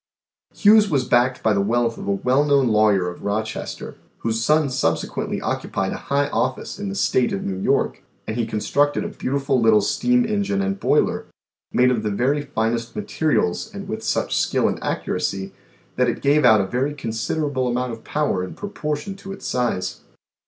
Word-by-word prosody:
Hughes 210 0 +6
was 135 -5 +1
backed 125 +1 +2
by 110 - +3
the 100 - +2
wealth 115 +3 +1
of - - -8
a - - +1
well 125 +8 +2
known 140 -4 +3
lawyer 105 -4 +3
of 90 - -7
Rochester, 110 +2 -4 0.2
whose 115 0 -1
son 150 +1 +3
subsequently 85 -11 -1
occupied - - -2
a - - -4
high 140 +1 +2
office 130 +9 -2
in 205 -1 -3
the 195 - -4
state 125 -10 +2
of 95 - -3
New 95 -1 -3
York, - - +1 0.2
and 110 - -4
he 115 -2 -1
constructed 140 +7 +1
a - - -3
beautiful 135 -1 -1
little 110 -2 +5
steam 245 - +2
engine 205 -2 0
and 195 0 -1
boiler, 150 - +1 0.4
made 125 +1 +4
of 120 -3 0
the 110 - -1
very 130 +8 +1
finest 115 -3 -2
materials 105 - 0
and - - -6
with - - -4
such - - 0
skill - - +2
and - - -2
accuracy 95 0 -2 0.4
that 125 -1 +3
it - - -4
gave 145 +2 +4
out 110 -4 +6
a - - -1
very 130 +8 -1
consid 115 +1 -3
erable 140 -5 0
amount 125 +1 -1
of 115 -1 -8
power 145 -11 -1
in 90 - -7
proportion 175 -3 -4
to 195 0 -9
its 195 - -9
size. 120 -7 -1
125 Hz, 190 wpm, -22 LUFS, 110-150 Hz, 0.4 s, Hughes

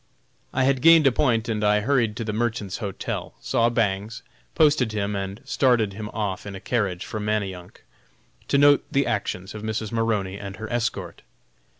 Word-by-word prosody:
I 130 - +1
had 130 -1 +2
gained 165 0 +7
a 135 - +6
point 115 -3 +1
and 110 -2 -1
I 105 0 +3
hurried 120 -3 +1
to 115 - -4
the 110 -1 -3
Merchants' 110 -3 -2
Hotel, 100 -4 -5
saw 115 0 +1
Bangs, 110 -1 -1 0.3
posted 145 -8 +3
him, 105 -1 -1
and 95 +1 -4
started 120 -6 +2
him 105 +1 -6
off 105 -3 -3
in 100 - -6
a - - -7
carriage 100 -6 -1
for 110 - -5
Manayunk 100 -4 -3 0.6
to - - +2
note 145 0 +5
the 140 0 +2
actions 100 -2 -3
of 105 - -7
Mrs. 110 0 -3
Maroney 105 -4 -1
and 100 -1 -7
her 110 +3 -7
escort. 105 -7 -2
110 Hz, 180 wpm, -24 LUFS, 100-120 Hz, 0.6 s, gained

